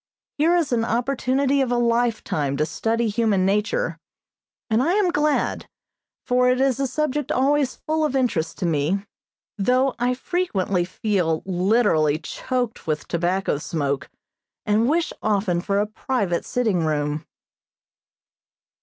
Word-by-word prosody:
Here 330 +4 +4
is 335 -6 +1
an 235 -2 +2
opportunity 265 +4 +1
of 255 -2 0
a - - +2
lifetime 230 - 0
to 150 - +1
study 225 +8 -1
human 210 -3 +1
nature, 210 - 0 0.7
and 220 +1 +2
I 330 +7 +2
am 395 -3 +2
glad, 300 -1 0 0.6
for 250 0 +3
it 250 0 +2
is 265 -1 +2
a 275 - +1
subject 295 +2 -1
always 275 0 +2
full 315 0 -1
of 300 -3 0
interest 230 -11 0
to 185 - -2
me, 170 +5 0 0.5
though 255 +5 +2
I 250 +1 +1
frequently 200 - -1
feel 180 -4 -1
literally 185 -5 +2
choked 245 +7 -4
with 150 -2 -2
tobacco 175 -2 0
smoke, 140 -4 -2 0.6
and 220 +3 +2
wish 330 +2 +1
often 195 -5 +1
for 200 +2 -1
a 205 - +2
private 210 -4 -2
sitting 215 -9 0
room. 150 0 -1
225 Hz, 135 wpm, -23 LUFS, 180-265 Hz, 0.7 s, Here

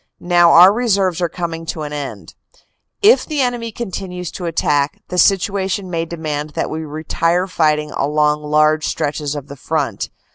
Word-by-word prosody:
Now 175 -1 +5
our 180 +4 +8
reserves 195 -7 +1
are 175 - +1
coming 165 -2 -5
to 155 - -4
an 150 0 -6
end. 145 -2 -6 0.7
If 440 +4 +6
the 305 -2 -4
enemy 240 -2 -1
continues 185 -5 -5
to 180 - -6
attack, 150 -3 0
the 180 - -1
situation 195 0 +1
may 165 -1 -1
demand 155 -3 -5
that - - -2
we 160 +1 -4
retire 165 +3 -1
fighting 155 -4 0
along 150 +1 +1
large 155 +1 +2
stretches 145 0 -2
of 145 -2 -6
the 140 - -9
front. 145 +1 -2
165 Hz, 160 wpm, -18 LUFS, 150-185 Hz, 0.7 s, our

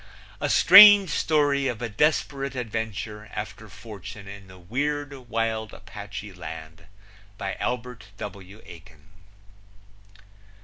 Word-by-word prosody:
A - - -2
strange 200 -1 +8
story 145 -3 +1
of 120 -4 -3
a 120 - -3
desperate 140 +3 -1
adventure 110 -2 -5
after 110 0 -7
fortune 105 0 -11
in 100 0 -11
the 95 0 -14
weird, 145 +9 -3 0.2
wild 110 -1 -2
Apache 100 0 -9
land. 80 -1 -10 0.5
By 100 -2 -4
Albert 125 -3 -4
W. 100 +1 -10
Aiken. 80 -1 -16
110 Hz, 105 wpm, -25 LUFS, 100-130 Hz, 0.5 s, strange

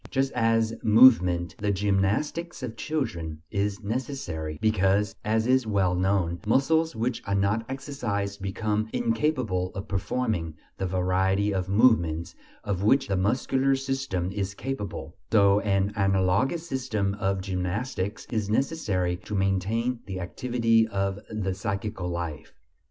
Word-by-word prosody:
Just 135 0 0
as 115 -1 +2
movement, 90 -8 +5
the 105 - -1
gymnastics 105 - 0
of 115 -3 -4
children, 85 - -3
is 100 +1 -1
necessary, 100 - -4
because, 100 -1 +2
as 110 +1 +1
is 130 -1 +3
well 95 -4 +2
known, 90 -2 +1
muscles 160 +7 +2
which 115 +2 -1
are 100 - +1
not 100 +3 +1
exercised 115 -8 -3
become 105 +2 -1
incapable 140 - 0
of 95 +3 -5
performing 95 -4 -2 0.2
the 95 - -1
variety 95 +2 +1
of 95 -1 -2
movements 85 -7 +3 0.3
of 100 -3 -2
which 135 +7 +3
the 95 - +1
muscular 130 +7 +1
system 135 -9 -2
is 100 -1 -3
capable, 135 -5 -5 0.2
so 100 -2 +5
an 100 0 0
analogous 100 - +1
system 110 -8 -1
of 95 -1 0
gymnastics 95 +2 -3
is 110 -4 -1
necessary 105 - 0
to 100 +4 -6
maintain 100 +6 0
the 95 -1 -4
activity 115 +4 +1
of 100 -1 -2
the 100 -3 -2
psychical 95 -1 -3
life. 85 -4 -5
100 Hz, 130 wpm, -26 LUFS, 95-120 Hz, 0.3 s, movement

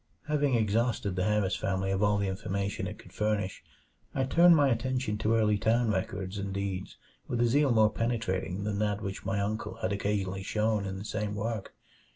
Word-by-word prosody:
Having 145 -3 +2
exhausted 110 -2 +1
the 90 - 0
Harris 105 -3 +1
family 95 0 -1
of 95 0 0
all 105 0 +3
the 100 -1 0
information 100 +1 -2
it - - -7
could - - -15
furnish, 105 -3 -1 0.5
I 135 - +2
turned 170 +6 +6
my 145 -3 +4
attention 125 -2 -1
to 110 +1 +2
early 105 -2 +3
town 115 +2 +2
records 95 0 -3
and 100 0 -3
deeds 95 -1 -4 0.3
with 120 - -2
a 120 - +4
zeal 140 +4 +3
more 110 -2 +5
penetrating 105 -5 -1
than 100 -1 -2
that 105 -1 0
which 95 -1 -5
my 100 +1 0
uncle 105 +2 -2
had - - -2
occasionally 100 -1 -1
shown 105 0 0
in 95 0 -4
the 100 - -7
same 105 -1 -2
work. 110 -1 -4
105 Hz, 190 wpm, -29 LUFS, 100-115 Hz, 0.5 s, turned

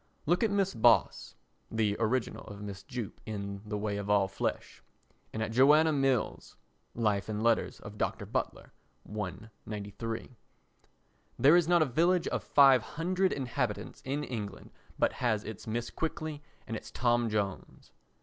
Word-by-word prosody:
Look 175 +4 +2
at 225 - +3
Mrs. 195 - 0
Boss 115 -7 +3 0.3
[the 110 -2 +1
original 115 +2 0
of 100 -2 -9
Mrs. 100 -2 -8
Jupp 125 -6 -6
in 100 -2 -5
The 105 0 -2
Way 105 0 -2
of 100 0 -5
All 100 -2 +4
Flesh] 95 - -4 0.5
and 110 - -2
at 110 - -3
Joanna 150 +6 +5
Mills 135 -4 0 0.4
[Life 105 -3 0
and 105 0 -2
Letters 115 -1 +1
of 105 0 -10
Dr. - - -1
Butler, - - -3 0.3
I, 105 -3 -4 0.3
93]. 110 +3 -5 1.0
There 140 +7 +6
is 175 -2 +4
not 175 -2 +5
a - - +1
village 170 +6 +2
of - - -2
500 165 +7 +4
inhabitants 120 -5 -3
in 140 +3 -2
England 110 -7 -6 0.3
but - - +2
has 110 -4 +1
its 110 0 -8
Mrs. 120 +2 -3
Quickly 155 -2 -3 0.2
and 115 - -4
its - - -7
Tom 120 -1 +1
Jones. 100 -3 -4
115 Hz, 150 wpm, -31 LUFS, 105-140 Hz, 1.0 s, There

